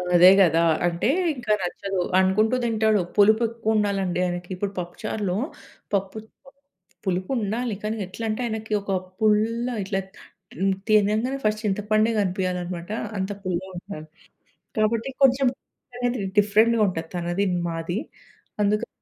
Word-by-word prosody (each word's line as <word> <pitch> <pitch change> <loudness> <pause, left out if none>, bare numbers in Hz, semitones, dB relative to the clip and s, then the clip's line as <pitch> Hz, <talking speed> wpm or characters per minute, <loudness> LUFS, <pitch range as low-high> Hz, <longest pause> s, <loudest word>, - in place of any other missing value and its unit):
అదే 175 +1 +9
కదా! 165 -3 +4 0.3
అంటే 170 +4 -1 0.3
ఇంకా 245 -4 0
నచ్చదు 190 +1 -2 0.2
అనుకుంటూ 210 +5 +3
తింటాడు. 220 -2 +2 0.2
పులుపు 215 +2 +5
ఎక్కువ 230 -1 -1
ఉండాలండి 195 -4 0
ఆయనకి. 175 0 -4
ఇప్పుడు 195 +2 -3
పప్పు 175 0 -6
చారులో 200 -4 -1 0.6
పప్పు 195 +1 -1 0.9
పులుపు 185 +2 -1
ఉండాలి 225 +2 -1
కానీ 215 +1 -2
ఎట్లంటే 215 +5 -4
ఆయనకి 220 -1 -4
ఒక 200 - -5 0.3
పుల్ల 220 +2 +2 0.2
ఇట్లా 195 0 -1 0.9
తినంగానే 215 +5 +3
ఫస్ట్ 215 0 +1
చింతపండే 215 +2 +2
కనిపియాలనమాట. 180 -2 -2 0.3
అంత 190 +1 -2
పుల్లగా 185 0 -3
ఉండాలి 175 -4 -8 0.7
కాబట్టి 225 +3 +1
కొంచెం 265 0 +5 0.9
డిఫరెంట్‌గా 215 +3 +4
ఉంటుంది 165 -3 -3
తనది 175 +3 -1 0.2
మాది. 165 +4 -3 0.6
అందుకని 210 +1 +1
205 Hz, 115 wpm, -24 LUFS, 185-220 Hz, 0.9 s, అదే